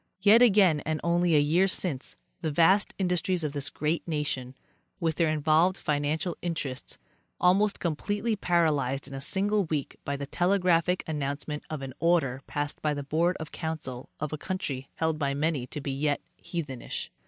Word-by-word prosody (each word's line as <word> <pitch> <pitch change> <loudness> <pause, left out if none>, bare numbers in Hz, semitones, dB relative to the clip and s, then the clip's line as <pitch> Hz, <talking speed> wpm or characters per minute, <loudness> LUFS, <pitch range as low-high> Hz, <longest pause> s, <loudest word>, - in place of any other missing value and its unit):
Yet 215 +4 +7
again, 195 -9 +6
and 155 +1 -2
only 170 -1 +3
a - - +6
year 165 +6 +3
since, 170 -8 -1 0.2
the 160 - -1
vast 170 +7 +4
industries 180 -1 0
of 150 -2 -2
this 140 -2 -1
great 155 +4 -2
nation, 140 -5 -2 0.4
with 165 -3 0
their 165 -2 +3
involved 155 +4 +3
financial 150 +3 -1
interests, 155 -7 -3 0.4
almost 200 +3 +3
completely 205 +7 -1
paralyzed 150 -8 +1
in 140 - -9
a 135 - -5
single 200 +5 +1
week 150 -3 -3
by 140 0 -2
the 140 - -4
telegraphic 180 +1 +2
announcement 150 0 -3
of 155 -3 -4
an 130 -1 -6
order 160 -7 +2
passed 145 0 -3
by 150 -1 +1
the 145 - -4
board 165 +5 +1
of 155 -1 -7
council 155 -6 -5
of 155 0 -3
a 155 - -3
country 145 -9 -4
held 160 -1 0
by 140 -2 0
many 145 -3 0
to 150 - -6
be 140 -1 -3
yet 145 +2 0 0.2
heathenish. 145 -8 -5
155 Hz, 170 wpm, -28 LUFS, 145-175 Hz, 0.4 s, Yet